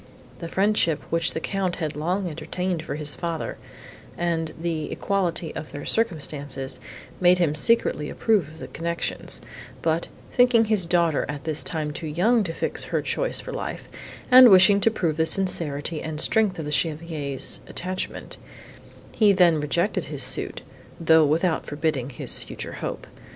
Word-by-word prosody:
The 170 Hz, -, -5 dB
friendship, 190 Hz, -4 st, +1 dB
which 165 Hz, 0 st, +1 dB
the -, -, -1 dB
Count 190 Hz, 0 st, -2 dB
had 155 Hz, -2 st, -4 dB
long 180 Hz, +6 st, -1 dB
entertained 170 Hz, +2 st, -3 dB
for 150 Hz, -3 st, -5 dB
his 150 Hz, -1 st, -3 dB
father, 170 Hz, -2 st, -4 dB, 0.6 s
and 165 Hz, -2 st, -1 dB
the 165 Hz, -2 st, -3 dB
equality 180 Hz, -4 st, -2 dB
of 155 Hz, -, -7 dB
their 145 Hz, -, -7 dB
circumstances 145 Hz, -, -2 dB, 0.4 s
made 180 Hz, 0 st, +5 dB
him 170 Hz, -4 st, +1 dB
secretly 155 Hz, -4 st, +2 dB
approve 210 Hz, -9 st, +1 dB
of 155 Hz, +1 st, -14 dB
the -, -, -8 dB
connection; 170 Hz, +1 st, -4 dB, 0.6 s
but, 165 Hz, +1 st, 0 dB, 0.3 s
thinking 245 Hz, -2 st, +5 dB
his 210 Hz, -5 st, +1 dB
daughter 170 Hz, -3 st, +2 dB
at 145 Hz, -1 st, -5 dB
this 155 Hz, -1 st, 0 dB
time 155 Hz, -3 st, -1 dB
too 160 Hz, -, -6 dB
young 210 Hz, +10 st, +2 dB
to 165 Hz, -, -3 dB
fix -, -, -1 dB
her -, -, -2 dB
choice -, -, -1 dB
for -, -, -7 dB
life, -, -, -5 dB, 0.5 s
and 255 Hz, -1 st, +10 dB
wishing 200 Hz, +1 st, +7 dB
to 225 Hz, -, +4 dB
prove 170 Hz, -8 st, -1 dB
the 160 Hz, 0 st, +2 dB
sincerity 160 Hz, -5 st, +1 dB
and 155 Hz, -1 st, -5 dB
strength 210 Hz, +1 st, +2 dB
of 160 Hz, -, -5 dB
the 150 Hz, -, -4 dB
Chevalier's 150 Hz, -3 st, -1 dB
attachment, 185 Hz, +1 st, -5 dB, 0.7 s
he 215 Hz, -3 st, +4 dB
then 175 Hz, -4 st, +4 dB
rejected 170 Hz, +7 st, 0 dB
his -, -, -1 dB
suit, -, -, 0 dB, 0.4 s
though 160 Hz, -2 st, +5 dB
without 160 Hz, +3 st, 0 dB
forbidding 145 Hz, -4 st, -2 dB
his 125 Hz, -, -1 dB
future -, -, -7 dB
hope. -, -, -5 dB
165 Hz, 160 wpm, -24 LUFS, 155-185 Hz, 0.7 s, and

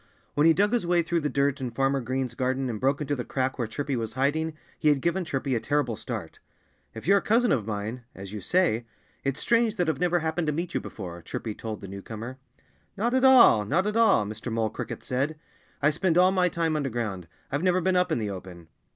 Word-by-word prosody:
When 150 Hz, +2 st, +4 dB
he 165 Hz, -, +7 dB
dug 205 Hz, +6 st, +2 dB
his 240 Hz, -, +2 dB
way 175 Hz, 0 st, +2 dB
through 170 Hz, +1 st, 0 dB
the 150 Hz, -2 st, -1 dB
dirt 140 Hz, 0 st, 0 dB
in 125 Hz, -, -2 dB
Farmer 135 Hz, +3 st, 0 dB
Green's 130 Hz, 0 st, -2 dB
garden 130 Hz, +1 st, -1 dB
and 110 Hz, -, -5 dB
broke 135 Hz, +3 st, +1 dB
into 145 Hz, 0 st, -1 dB
the 125 Hz, -, -3 dB
crack 130 Hz, +1 st, -2 dB
where 120 Hz, -, 0 dB
Chirpy 140 Hz, +4 st, -3 dB
was 115 Hz, -2 st, -3 dB
hiding 155 Hz, +4 st, 0 dB, 0.2 s
he 155 Hz, -, +3 dB
had 145 Hz, -2 st, +3 dB
given 170 Hz, +6 st, 0 dB
Chirpy 135 Hz, -4 st, -2 dB
a 120 Hz, -, +1 dB
terrible 140 Hz, -3 st, 0 dB
start. 110 Hz, -7 st, -6 dB, 0.6 s
"If 110 Hz, -, -8 dB
you're 200 Hz, +3 st, +5 dB
a -, -, -10 dB
cousin 235 Hz, +1 st, +3 dB
of 110 Hz, -5 st, +1 dB
mine 110 Hz, +3 st, -4 dB
as 95 Hz, +1 st, -9 dB
you 105 Hz, -, -5 dB
say 160 Hz, -, +1 dB, 0.4 s
it's 135 Hz, 0 st, -1 dB
strange 230 Hz, -2 st, +2 dB
that 180 Hz, -5 st, 0 dB
I've 155 Hz, -4 st, 0 dB
never 175 Hz, 0 st, +2 dB
happened 160 Hz, 0 st, -1 dB
to 150 Hz, -, +1 dB
meet 170 Hz, +3 st, -3 dB
you -, -, +1 dB
before," 85 Hz, -4 st, -8 dB
Chirpy 110 Hz, +5 st, -5 dB
told 110 Hz, 0 st, -6 dB
the 100 Hz, -, -7 dB
newcomer. 110 Hz, +6 st, -7 dB, 0.6 s
"Not 235 Hz, +5 st, 0 dB
at 260 Hz, 0 st, +2 dB
all! 255 Hz, -, +7 dB
Not 180 Hz, -, +1 dB
at 210 Hz, +1 st, -1 dB
all!" 220 Hz, -, +4 dB
Mr. 110 Hz, +3 st, -6 dB
Mole 110 Hz, -1 st, 0 dB
Cricket -, -, -6 dB
said. 140 Hz, +5 st, -1 dB, 0.5 s
"I 150 Hz, -, +5 dB
spend 170 Hz, +2 st, +1 dB
all 185 Hz, +1 st, +6 dB
my 180 Hz, -1 st, +2 dB
time 165 Hz, -1 st, 0 dB
underground. 115 Hz, -, -3 dB, 0.2 s
I've 145 Hz, +2 st, 0 dB
never 185 Hz, 0 st, +3 dB
been 185 Hz, +1 st, +1 dB
up 180 Hz, -1 st, +2 dB
in -, -, +2 dB
the 105 Hz, -3 st, -2 dB
open." 90 Hz, -3 st, -9 dB
140 Hz, 235 wpm, -27 LUFS, 115-175 Hz, 0.6 s, he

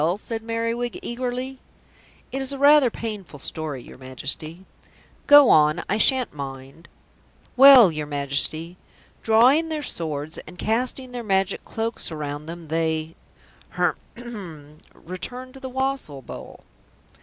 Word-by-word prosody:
said 225 Hz, +1 st, -5 dB
Merriwig 230 Hz, +1 st, -2 dB
eagerly. 255 Hz, +2 st, -4 dB, 0.7 s
"It 270 Hz, -, -3 dB
is 270 Hz, +1 st, -1 dB
rather 285 Hz, 0 st, +6 dB
a -, -, +1 dB
painful 210 Hz, -9 st, -7 dB
story, 145 Hz, -2 st, -5 dB
your -, -, -14 dB
Majesty." 150 Hz, +7 st, -3 dB, 0.6 s
"Go 290 Hz, -3 st, +8 dB
on, 155 Hz, +2 st, +4 dB
I 210 Hz, -, 0 dB
shan't 260 Hz, +1 st, +3 dB
mind." 135 Hz, +2 st, -9 dB, 0.7 s
"Well, 260 Hz, -7 st, +9 dB
your 155 Hz, -1 st, -5 dB
Majesty, 145 Hz, +4 st, -2 dB, 0.4 s
drawing 255 Hz, +9 st, +4 dB
their 310 Hz, -2 st, -3 dB
swords 155 Hz, -, -4 dB
and 180 Hz, +3 st, -12 dB
casting 250 Hz, +5 st, -1 dB
their 245 Hz, -1 st, -5 dB
Magic 195 Hz, -2 st, 0 dB
Cloaks 225 Hz, -4 st, -4 dB
around 150 Hz, -1 st, -5 dB
them 165 Hz, -1 st, -9 dB
they 160 Hz, 0 st, -1 dB, 0.6 s
h'r'm 170 Hz, -11 st, -5 dB, 0.2 s
returned 250 Hz, +9 st, -8 dB
to 270 Hz, -, -11 dB
the 260 Hz, -1 st, -7 dB
wassail 265 Hz, -, -3 dB
bowl." -, -, -10 dB
200 Hz, 125 wpm, -23 LUFS, 155-250 Hz, 0.7 s, Well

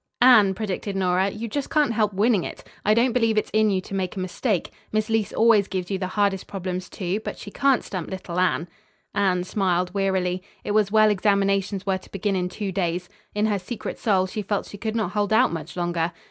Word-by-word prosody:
"Anne," 215 Hz, -7 st, +7 dB
predicted 200 Hz, -1 st, -3 dB
Nora, 185 Hz, 0 st, +2 dB
"you 215 Hz, +4 st, -5 dB
just 280 Hz, +4 st, -3 dB
can't 295 Hz, -6 st, +2 dB
help 215 Hz, -2 st, +2 dB
winning 205 Hz, -1 st, +2 dB
it! -, -, -7 dB, 0.2 s
I 215 Hz, -, +4 dB
don't 240 Hz, +2 st, +3 dB
believe 230 Hz, -3 st, +2 dB
it's 215 Hz, -, 0 dB
in 215 Hz, 0 st, +4 dB
you 190 Hz, -2 st, +1 dB
to 190 Hz, -, -10 dB
make 190 Hz, -2 st, -2 dB
a -, -, -4 dB
mistake. 185 Hz, +2 st, -1 dB, 0.2 s
Miss 215 Hz, +1 st, 0 dB
Leece 220 Hz, -3 st, +1 dB
always 220 Hz, -3 st, +4 dB
gives 185 Hz, -1 st, -4 dB
you 190 Hz, -, -1 dB
the 185 Hz, -, -2 dB
hardest 200 Hz, -2 st, +1 dB
problems, 185 Hz, -2 st, -4 dB
too, 185 Hz, +2 st, -2 dB
but -, -, -5 dB
she 205 Hz, -, -9 dB
can't 275 Hz, +2 st, +2 dB
stump 185 Hz, -5 st, -5 dB
little 180 Hz, -2 st, -4 dB
Anne." 180 Hz, -2 st, +1 dB, 0.5 s
Anne 190 Hz, -3 st, +2 dB
smiled 180 Hz, -2 st, 0 dB
wearily. 190 Hz, -2 st, 0 dB, 0.2 s
It -, -, -3 dB
was 210 Hz, -1 st, +2 dB
well 215 Hz, 0 st, +5 dB
examinations 200 Hz, -1 st, +1 dB
were 190 Hz, -1 st, 0 dB
to -, -, -18 dB
begin 195 Hz, 0 st, -1 dB
in 180 Hz, -1 st, -1 dB
two 195 Hz, +1 st, -4 dB
days. 175 Hz, -1 st, -2 dB, 0.3 s
In 210 Hz, +1 st, +2 dB
her 210 Hz, -2 st, +1 dB
secret 210 Hz, +5 st, -6 dB
soul 195 Hz, -5 st, +2 dB
she 200 Hz, +3 st, -4 dB
felt 205 Hz, 0 st, -2 dB
she 205 Hz, -, -10 dB
could 220 Hz, +1 st, -3 dB
not 215 Hz, -5 st, 0 dB
hold 205 Hz, -1 st, 0 dB
out 220 Hz, -, +4 dB
much 165 Hz, +1 st, -6 dB
longer. 175 Hz, -1 st, 0 dB
195 Hz, 220 wpm, -24 LUFS, 185-215 Hz, 0.5 s, Anne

